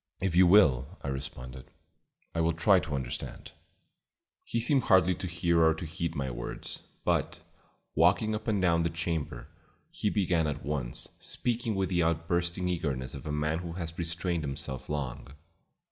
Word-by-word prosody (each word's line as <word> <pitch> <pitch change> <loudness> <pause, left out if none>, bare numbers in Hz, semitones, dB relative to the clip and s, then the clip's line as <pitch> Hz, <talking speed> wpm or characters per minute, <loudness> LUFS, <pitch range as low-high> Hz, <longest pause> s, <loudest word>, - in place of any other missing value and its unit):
"If 95 -2 -1
you 90 0 +7
will," 80 -5 +5
I 70 - -2
responded, 65 -1 -6 0.6
"I 85 - 0
will 80 0 +2
try 90 +3 +5
to 75 -5 -4
understand." 65 -3 -5 0.9
He 115 - -1
seemed 130 +3 +3
hardly 95 -2 +5
to 90 - -5
hear 85 -1 +2
or 80 -1 +5
to 80 - -6
heed 85 +1 -3
my 70 -3 -2
words, - - -6 0.2
but, - - +1 0.5
walking 95 +7 +4
up 110 +1 -4
and 105 -3 +2
down 85 -2 +3
the 85 - +1
chamber, 80 -7 -3 0.4
he 105 - 0
began 90 -6 +1
at 70 -2 -4
once, 70 -5 -2
speaking 115 -2 -1
with 95 -1 0
the 90 -2 +2
outbursting 85 +2 0
eagerness 70 -7 -2
of 70 +3 -8
a - - -2
man 75 +2 0
who 85 -2 -6
has 85 -2 -5
restrained 85 0 -1
himself 70 -2 -5
long. 70 -1 -4
85 Hz, 165 wpm, -30 LUFS, 75-90 Hz, 0.9 s, you